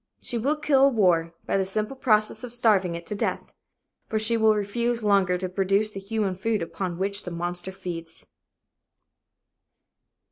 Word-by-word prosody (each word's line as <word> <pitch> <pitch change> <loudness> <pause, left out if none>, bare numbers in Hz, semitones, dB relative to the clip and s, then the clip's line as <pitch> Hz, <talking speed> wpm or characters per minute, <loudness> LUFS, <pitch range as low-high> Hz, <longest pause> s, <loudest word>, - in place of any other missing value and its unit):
She 240 - -2
will 280 +7 +1
kill 280 -2 +4
war 175 -8 +2
by - - 0
the 195 - +2
simple 215 +6 -2
process 215 -3 +1
of 245 - -6
starving 205 -7 +2
it 170 0 -7
to - - -4
death. 205 - -3 0.5
For 220 - -1
she 220 +2 +2
will 220 -1 +4
refuse 235 +3 -1
longer 195 -3 +3
to 185 +1 -3
produce 195 +3 +1
the 195 - -6
human 200 -1 -2
food 210 0 -1
upon 175 0 -4
which 200 +2 -1
the - - -5
monster 175 +2 -3
feeds. 165 -3 -8
200 Hz, 165 wpm, -25 LUFS, 180-225 Hz, 0.5 s, kill